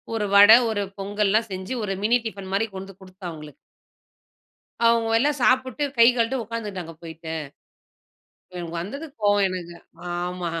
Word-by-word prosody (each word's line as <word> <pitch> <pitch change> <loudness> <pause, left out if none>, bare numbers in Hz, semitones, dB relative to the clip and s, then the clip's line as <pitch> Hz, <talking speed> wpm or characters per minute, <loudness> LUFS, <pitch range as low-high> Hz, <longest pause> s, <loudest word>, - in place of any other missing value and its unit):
ஒரு 210 - -1
வடை, 205 +3 +10
ஒரு 205 -2 -1 0.2
பொங்கல்லாம் 205 +2 0
செஞ்சு 190 +6 -5
ஒரு 195 -2 -2
மினி 235 +3 +3
டிஃபன் 195 -3 -8
மாரி 225 +3 +1
கொண்டு 190 +1 -7
கொடுத்தேன் 185 -1 -9
அவங்களுக்கு. 150 -3 -11 1.3
அவங்க 230 -1 +3
எல்லாம் 290 +3 +1
சாப்பிட்டு 260 +3 +2
கை 230 - +8
கழட்டு 235 +2 +1
உட்கார்ந்துகிட்டாங்க 210 -7 -6
போயிட்டு. 160 0 -9 1.3
எனக்கு 170 -1 -6
வந்தது 275 - -6 0.2
கோவம் 205 -1 +3
எனக்கு, 175 -2 -6 0.5
ஆமா. 180 -1 -3
205 Hz, 135 wpm, -24 LUFS, 185-230 Hz, 1.3 s, வடை